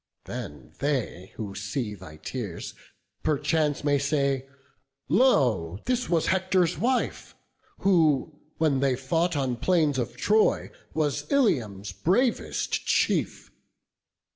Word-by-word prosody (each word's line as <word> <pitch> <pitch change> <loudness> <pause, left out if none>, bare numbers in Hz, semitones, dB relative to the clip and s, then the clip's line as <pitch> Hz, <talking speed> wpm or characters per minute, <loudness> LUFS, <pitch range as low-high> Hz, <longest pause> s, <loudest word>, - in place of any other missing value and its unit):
Then 70 -4 -7
they 125 - -2
who 105 -3 -5
see 105 +3 -3
thy 90 -6 -11
tears 105 -4 -6 0.5
perchance 150 0 +1
may 145 -1 +2
say, 140 -2 0 0.6
'Lo! 125 - +3
this 250 0 0
was 165 -2 +2
Hector's 185 -2 +2
wife, 255 +2 -1 0.5
who, 155 -5 +2 0.2
when 150 -4 +2
they 135 -1 +2
fought 165 +6 0
On 130 -3 0
plains 155 -1 +2
of 120 0 -3
Troy, 215 - +2 0.2
was 150 - -1
Ilium's 110 - +1
bravest 215 - 0
chief. - - 0
145 Hz, 110 wpm, -26 LUFS, 120-170 Hz, 0.6 s, Lo